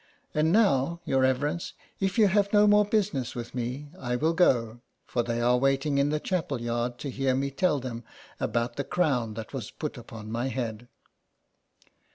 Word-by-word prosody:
And 155 +1 +2
now, 170 - +3
your 135 0 +2
reverence, 145 +6 0 0.3
if 195 +1 -1
you 215 -2 +6
have 200 +1 +2
no 210 0 +6
more 210 0 +5
business 200 - 0
with 120 -1 -6
me 125 +4 -4
I 125 -1 -2
will 155 +6 +1
go, 120 -9 +2 0.2
for 120 - 0
they 115 0 -2
are 125 +1 +3
waiting 135 +2 +2
in 140 +1 +3
the 150 0 0
chapel 160 -7 -2
yard 120 +1 -2
to 140 - -4
hear 130 0 0
me 140 +1 -1
tell 150 -1 +1
them 120 -2 -6 0.4
about 120 0 -1
the 140 - 0
crown 130 -11 0
that 110 +3 -7
was 125 -6 -4
put 150 -5 -5
upon 110 -2 -9
my 120 +3 -1
head." 120 -3 -4
135 Hz, 185 wpm, -27 LUFS, 120-160 Hz, 0.4 s, you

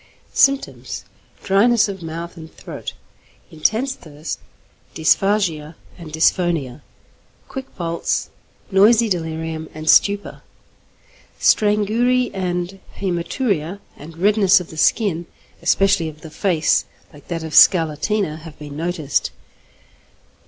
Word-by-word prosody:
Symptoms. 275 0 +1 0.4
Dryness 215 +3 +4
of 195 -2 -6
mouth 165 +1 -6
and 160 -2 -11
throat, - - -8 0.6
intense 220 - 0
thirst, 155 - -7 0.6
dysphagia 165 -2 +1 0.2
and 165 -3 -10
dysphonia, 160 -4 +1 0.7
quick 265 -1 -8
pulse, 170 -1 -2 0.4
noisy 220 +4 +5
delirium 160 -3 -3
and 155 0 -7
stupor. 200 +4 +3 1.0
Strangury 220 +4 +2
and 180 0 -3 0.2
hæmaturia, 180 - -2 0.2
and 160 +3 -12
redness 200 +1 +4
of 180 - -9
the - - -10
skin, 175 -2 +1 0.3
especially 195 -4 +2
of 155 0 -14
the 160 - -10
face, 160 -1 +1 0.3
like 145 - -16
that 165 -2 -4
of 160 -1 -6
scarlatina, 160 +2 +4
have 160 -1 -12
been 145 -1 -9
noticed. 160 -2 -1
175 Hz, 105 wpm, -20 LUFS, 160-205 Hz, 1.0 s, noisy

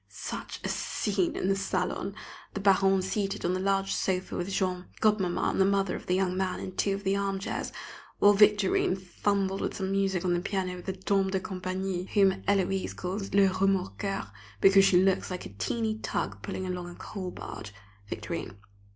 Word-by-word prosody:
Such - - -6
a - - -1
scene 195 -4 -1
in - - -1
the 195 - +3
salon! 195 0 -2 0.4
The - - -1
Baronne 195 -1 +4
seated 195 0 -2
on 175 - +2
the 185 - -1
large 195 0 +1
sofa 185 -1 -1
with 175 +2 -2
Jean; 185 -2 -1
Godmamma 210 -5 +2
and - - +1
the - - +6
mother 195 -1 +1
of - - -8
the 180 - +2
young 185 -1 +1
man 190 -1 -1
in 185 - -6
two 200 -1 +1
of 200 - -7
the 195 0 +1
armchairs; 195 -1 -2 0.5
while 205 0 +6
Victorine 205 -2 +4
fumbled 195 +1 -1
with - - -2
some 190 -1 -2
music 195 -2 +1
on 180 - +2
the 175 - +1
piano 185 0 -2
with 180 - -10
the 190 - -1
dame 195 +1 +1
de 190 0 0
compagnie, 185 0 -3
whom 195 -2 +6
Héloise 195 -1 0
calls 195 +2 -4
"le 200 -1 +6
Remorqueur," 195 - 0 0.3
because 195 0 +7
she 180 -1 +5
looks 190 -1 +2
like 180 -1 -5
a - - -7
teeny 220 - -2
tug 100 - -3
pulling 185 - -4
along 180 -1 -4
a 175 - -10
coal 190 -3 -6
barge 105 - -8 0.4
(Victorine). 95 - -5
190 Hz, 190 wpm, -29 LUFS, 185-195 Hz, 0.5 s, because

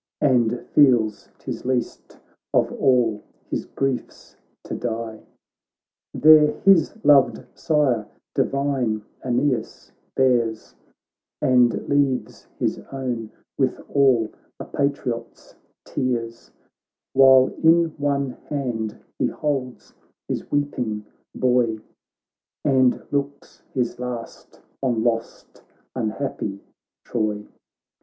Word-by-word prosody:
And 120 -3 +2
feels 120 -7 +3
'tis - - -6
least 125 -1 -3 0.4
of - - +3
all 120 -5 +2 0.3
his - - -2
griefs 135 -2 -4 0.3
to - - -7
die: 115 -2 -4 0.9
There 155 -1 +6
his 195 -4 +4
loved 140 -3 +5
sire, 135 -9 +1 0.3
divine 135 -6 0 0.2
Aeneas, 125 -2 -1 0.2
bears, 120 -4 +1 0.7
And 125 -4 +3
leaves 140 -3 0
his - - -1
own 125 -5 -4 0.3
with - - +1
all 130 -6 +4 0.3
a - - -6
patriot's 140 -4 -3 0.3
tears; 115 -2 -3 0.6
While 130 -1 +7
in 165 +1 +5
one 140 -2 0 0.2
hand 120 -7 -3 0.2
he - - +2
holds 135 -4 -4 0.3
his - - -4
weeping 120 -7 -2 0.3
boy. 125 -3 +2 0.9
And 130 -3 +3
looks 140 0 -4
his 125 -3 -2
last 125 -2 -7 0.2
on 120 -4 0
lost 115 -1 -3 0.3
unhappy 110 -4 -3 0.5
Troy. 105 -2 -2
125 Hz, 90 wpm, -23 LUFS, 115-140 Hz, 0.9 s, While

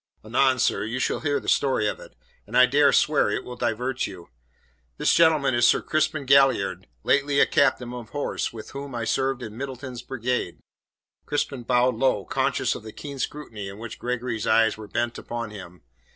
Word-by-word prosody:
Anon, 130 +4 +3
sir, 125 -4 +1
you 115 +4 -3
shall 130 - 0
hear 145 -2 0
the - - -13
story 130 -6 +2
of - - -3
it, - - -14 0.3
and - - -1
I 125 - +8
dare 140 +2 +4
swear 150 -1 +3
it - - -2
will 125 - -8
divert 125 +2 -1
you. 90 -3 -11 0.7
This - - +2
gentleman 155 -5 +4
is 120 0 +4
Sir - - +4
Crispin 155 -2 0
Galliard, 135 - +3 0.2
lately 140 0 +2
a - - +7
captain 130 -3 +1
of 120 -3 -8
horse 145 -1 -3
with 110 -2 -10
whom 140 -2 -7
I 115 - -2
served 130 +2 0
in 110 -2 -8
Middleton's 130 -1 -6
Brigade." 125 0 -3 0.7
Crispin 140 -3 -2
bowed 125 +1 +2
low, 115 -7 +1
conscious - - 0
of - - -7
the 110 0 -9
keen 140 +3 -8
scrutiny 110 -10 -5
in 100 - -10
which 115 0 -8
Gregory's 120 -2 -3
eyes 110 0 +4
were 110 -1 -10
bent 120 +2 -2
upon 115 -2 -5
him. 90 -6 -11
125 Hz, 190 wpm, -25 LUFS, 115-140 Hz, 0.7 s, I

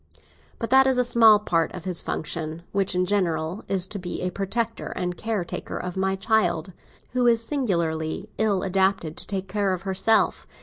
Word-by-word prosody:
But 230 - -4
that 265 0 +6
is 260 -1 +2
a 250 - +4
small 225 -3 +6
part 170 -6 0
of 180 - -7
his 180 -3 +1
function, 160 +1 -4
which, 195 -2 0
in 180 0 +2
general, 175 -2 -1
is 190 -2 +1
to 200 +1 -5
be 180 -1 -5
a 180 - -1
protector 200 +5 -2
and 180 -1 -2
caretaker 210 -3 -3
of 180 -1 -5
my 190 0 0
child, 190 -4 +1 0.4
who 250 -1 +2
is 230 -1 +4
singularly 170 - -1
ill 210 -4 +2
adapted 190 -4 +1
to - - -7
take 190 -1 -3
care 195 -1 0
of 180 - -10
herself. 195 +3 +2
190 Hz, 180 wpm, -25 LUFS, 175-220 Hz, 0.4 s, that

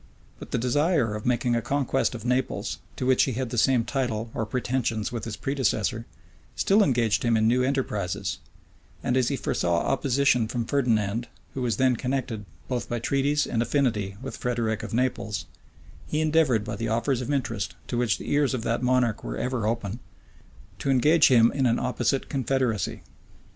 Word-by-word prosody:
But - - -9
the - - -1
desire 145 - +1
of 105 +3 -5
making 120 -1 +1
a 115 - +1
conquest 135 -1 0
of 115 -1 -8
Naples, 125 +1 -1 0.2
to - - -3
which 130 0 +4
he 130 - -2
had 125 0 -3
the - - -3
same 125 -1 +3
title 120 -4 -2
or 110 - -2
pretensions 120 -2 -1
with 120 -3 -4
his 110 -2 -4
predecessor, 115 -4 -1 0.5
still 200 +2 +3
engaged 120 - +2
him 120 -2 +2
in 110 0 +3
new 125 +2 +3
enterprises: 125 -9 -1 0.7
and· 125 - +1
as 130 -2 +2
he 140 - 0
foresaw 85 -9 0
opposition 135 -3 +2
from 120 0 -2
Ferdinand, 115 -4 0 0.3
who 135 - -4
was 120 -4 0
connected 125 -3 0 0.2
both 125 -2 -3
by 120 - -1
treaties 140 +5 +1
and 115 - -1
affinity 115 -6 0
with 135 - -6
Frederick 115 -3 -1
of - - -6
Naples, 115 -3 -1 0.6
he 150 - -1
endeavored 155 -8 +3
by 105 0 -4
the 115 +3 -3
offers 115 +3 0
of 125 +3 -3
interest, 120 -7 -2
to - - -4
which 120 -3 +1
the - - -6
ears 145 -2 +2
of 115 - -4
that 115 +1 0
monarch 125 -3 +1
were - - -4
ever 125 -4 -1
open, 115 -1 -2 0.8
to - - -2
engage 150 +4 +5
him 115 -3 +5
in 135 -2 +1
an 115 - +2
opposite 130 +2 0
confederacy. 130 -6 -1
125 Hz, 180 wpm, -26 LUFS, 115-135 Hz, 0.8 s, engage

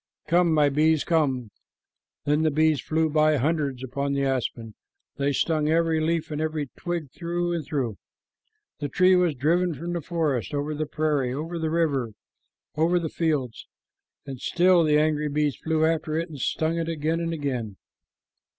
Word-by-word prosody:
Come, 170 +1 +3
my 150 -2 +4
bees, 155 +2 +2
come." 135 -9 0 0.7
Then 150 +1 +2
the 160 - +3
bees 155 -2 +2
flew 160 0 0
by 155 0 +3
hundreds 140 -2 -1
upon 140 +2 -2
the 140 0 0
aspen. 125 -4 -2 0.4
They 140 0 +1
stung 155 +2 +1
every 165 0 +2
leaf 160 0 -1
and 150 0 -2
every 155 -3 -2
twig 170 -6 -4
through 175 +1 -2
and 165 -2 -2
through. 130 -8 -3 0.8
The 145 -1 -3
tree 185 +5 +4
was 180 -4 +2
driven 165 +5 +1
from 170 +5 -5
the 170 - -2
forest, 145 - -1
over 145 +2 -2
the 155 0 -3
prairie, 145 -5 0
over 165 +4 -4
the 160 -1 -1
river, 145 -9 0 0.6
over 165 +3 +2
the 165 -2 -2
fields; 145 -9 -2 0.6
and 135 -3 -8
still 180 -1 +4
the 150 -1 +3
angry 150 0 +1
bees 150 -1 0
flew 160 -1 0
after 160 -1 0
it 165 +1 -2
and 150 -3 -9
stung 160 +5 0
it 165 0 -2
again 160 +1 -1
and 165 0 -2
again. 125 -10 -3
155 Hz, 170 wpm, -25 LUFS, 140-165 Hz, 0.8 s, my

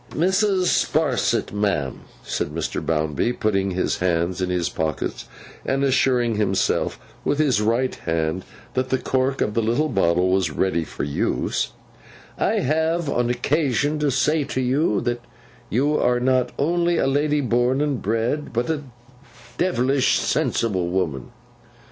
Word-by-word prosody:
'Mrs. 190 +2 +2 0.2
Sparsit, 140 -6 0
ma'am,' 100 -10 -1 0.2
said - - -2
Mr. 80 +2 -3
Bounderby, 80 - 0
putting 100 -4 0
his 90 0 -1
hands 90 +1 0
in 90 - 0
his 90 -2 0
pockets, 80 -1 -3 0.4
and 135 +1 0
assuring 125 -4 +2
himself 95 -3 0 0.2
with 145 - 0
his 140 -8 +2
right 115 +4 +1
hand 80 +2 -2 0.3
that 130 0 -1
the 130 - +2
cork 130 +1 0
of 105 - 0
the 115 - +1
little 120 +8 +1
bottle 90 -3 +2
was 95 -3 +2
ready 85 +2 0
for - - -6
use, 70 0 -1 0.7
'I - - +2
have 160 +3 0
no 120 -2 0
occasion 145 +3 +1
to 150 -1 +1
say 145 +4 +2
to 130 - -3
you, 130 -3 +1
that 120 0 -2 0.5
you 140 +7 +1
are 125 0 +2
not 125 0 +2
only 170 +3 +1
a - - +2
lady 145 +2 +1
born 125 0 +1
and 145 -4 0
bred, 115 +8 -1
but 120 +6 -1
a 155 -2 -2 0.8
devilish 135 -6 +2
sensible 95 -6 0
woman. 85 -7 -2
120 Hz, 145 wpm, -22 LUFS, 95-145 Hz, 0.8 s, Mrs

